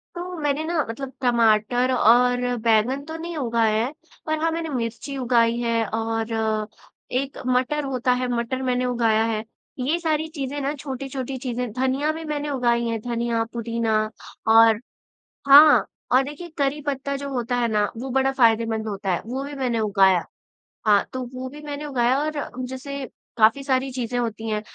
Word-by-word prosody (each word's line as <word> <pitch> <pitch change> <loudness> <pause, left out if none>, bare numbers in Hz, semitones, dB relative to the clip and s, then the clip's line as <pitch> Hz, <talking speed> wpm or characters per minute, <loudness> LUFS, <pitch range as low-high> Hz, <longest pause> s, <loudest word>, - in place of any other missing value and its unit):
तो 355 0 -5
मैंने 295 0 0
ना 320 -1 0
मतलब 265 +3 -5
टमाटर 240 0 +3
और 245 +1 +4
बैंगन 230 +4 +2
तो 320 - -7
नहीं 335 +1 -6
उगाएँ 230 -4 +1
हैं, 260 +5 -3 0.3
पर 315 0 0
हाँ, 325 +1 +1
मैंने 325 0 -3
मिर्ची 250 +1 -4
उगाई 235 -2 +2
हैं 230 -1 0
और 225 -1 -1 0.5
एक 275 +1 -3
मटर 255 +4 +1
होता 255 -2 0
है, 250 0 0
मटर 235 +3 -2
मैंने 250 -1 0
उगाया 230 -3 +2
है। 220 -1 -1 0.4
ये 275 +7 +1
सारी 315 -1 0
चीज़ें 280 0 -3
ना 280 +2 -1
छोटी-छोटी 270 -2 -5
चीज़ें 245 -2 -3
धनिया 265 +4 0
भी 320 +1 -6
मैंने 295 -1 -3
उगाई 240 -3 +1
हैं, 225 -1 -2
धनिया, 235 -1 -1
पुदीना 230 -1 0 0.5
और 225 -1 +7 0.7
हाँ, 295 +2 +8 0.3
और 255 - +6
देखिए 295 +5 -8
करी 280 +1 0
पत्ता 280 0 -2
जो 280 0 -5
होता 245 -1 -2
है 240 -1 +1
ना, 210 -1 +1
वो 260 +3 -5
बड़ा 265 +1 +2
फायदेमंद 225 -3 +2
होता 195 -2 -3
है 175 - -1
वो 260 +4 -3
भी 290 +1 -6
मैंने 250 -5 -1
उगाया, 195 -4 +3 0.6
हाँ, 205 -2 +5
तो 255 0 -3
वो 255 0 -5
भी 295 +2 -11
मैंने 290 0 -5
उगाया 255 -2 +1
और 310 - -2 0.3
जैसे 275 +1 -6 0.3
काफ़ी 225 +5 +4
सारी 265 -1 0
चीज़ें 245 -1 -3
होती 225 -1 -3
हैं 210 0 -1
250 Hz, 170 wpm, -23 LUFS, 230-275 Hz, 0.7 s, हाँ